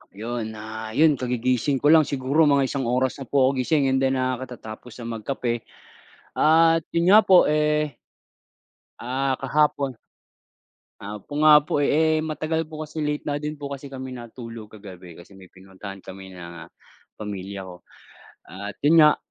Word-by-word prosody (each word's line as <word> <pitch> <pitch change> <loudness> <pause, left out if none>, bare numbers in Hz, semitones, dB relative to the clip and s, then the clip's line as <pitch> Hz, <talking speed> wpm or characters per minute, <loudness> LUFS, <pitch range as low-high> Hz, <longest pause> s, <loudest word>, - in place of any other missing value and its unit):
Yun, 110 +1 -5
ah, 110 +1 -7
yun 155 -3 +4
kagigising 125 +1 0
ko 145 - +6
lang 160 -2 +6
siguro 140 +3 +2
mga 140 -1 +4
isang 135 -1 -2
oras 130 +3 0
na 135 - -8
po 140 +1 +2
ako 135 - -4
gising 135 +1 +1
and 130 - +2
then, 135 0 +1
ah, 130 -1 -1
katatapos 125 -3 -9
na 115 -1 -5
magkape 120 0 -3 0.6
at 165 +1 +4 0.2
yun 170 +2 +3
nga 210 - +9
po, 185 -2 +7
eh 150 -1 +1 1.0
Ah, 130 +2 -1
kahapon 140 0 +1 1.1
Ah, 105 +1 -7
po 145 +9 -7
nga 150 -1 +8
po, 145 - -2
eh, 155 +2 +2
matagal 160 +1 -2
po 155 0 -8
kasi 155 0 -4
late 150 0 -2
na 145 -1 -2
din 150 +1 -4
po 145 -2 -7
kasi 140 0 -7
kami 130 -2 -7
natulog 115 -1 -9
kagabi 95 -4 -12
kasi 90 +4 -15
may 95 - -14
pinuntahan 95 +1 -11
kami 95 0 -11
ng, 85 -1 -10
ah, - - -20 0.4
pamilya 100 -2 -7
ko. 90 -1 -14 0.6
At 100 +2 -8
yun 160 +2 +6
nga, 150 -1 +6
130 Hz, 170 wpm, -24 LUFS, 110-150 Hz, 1.1 s, nga